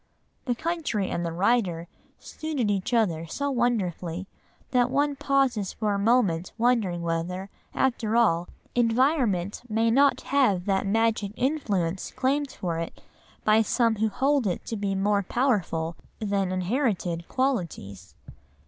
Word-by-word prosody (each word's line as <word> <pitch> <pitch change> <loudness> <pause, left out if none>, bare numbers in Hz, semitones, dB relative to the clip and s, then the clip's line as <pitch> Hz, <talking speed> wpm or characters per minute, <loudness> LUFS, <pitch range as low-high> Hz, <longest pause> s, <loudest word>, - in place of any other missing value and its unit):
The 245 -3 0
country 305 - -2
and 170 - -2
the 170 - -2
writer 180 -2 +1 0.3
suited 290 -9 -3
each 195 +1 -1
other 175 -9 +1
so 280 - -2
wonderfully, 190 -8 -1 0.5
that 250 -1 +3
one 285 +2 +1
pauses 265 -8 +1
for 210 -2 -1
a 200 - -1
moment 200 -6 +2
wondering 225 -8 +1
whether, 175 +3 -3 0.2
after 235 -4 0
all, 175 -8 +3 0.2
environment 235 - +1
may 225 +1 +2
not 280 +3 +4
have 235 -11 +2
that 195 -1 0
magic 220 -1 +1
influence 200 - -1
claimed 280 +2 0
for 170 -7 -3
it 165 - -6 0.4
by 215 0 +5
some 225 0 +1
who 220 +1 +1
hold 270 +2 +1
it 180 - -3
to 225 - -4
be 200 -2 -1
more 200 +1 +2
powerful 190 -8 0 0.2
than 200 -3 -1
inherited 185 -4 -1
qualities. 165 - -2
210 Hz, 135 wpm, -26 LUFS, 180-250 Hz, 0.5 s, by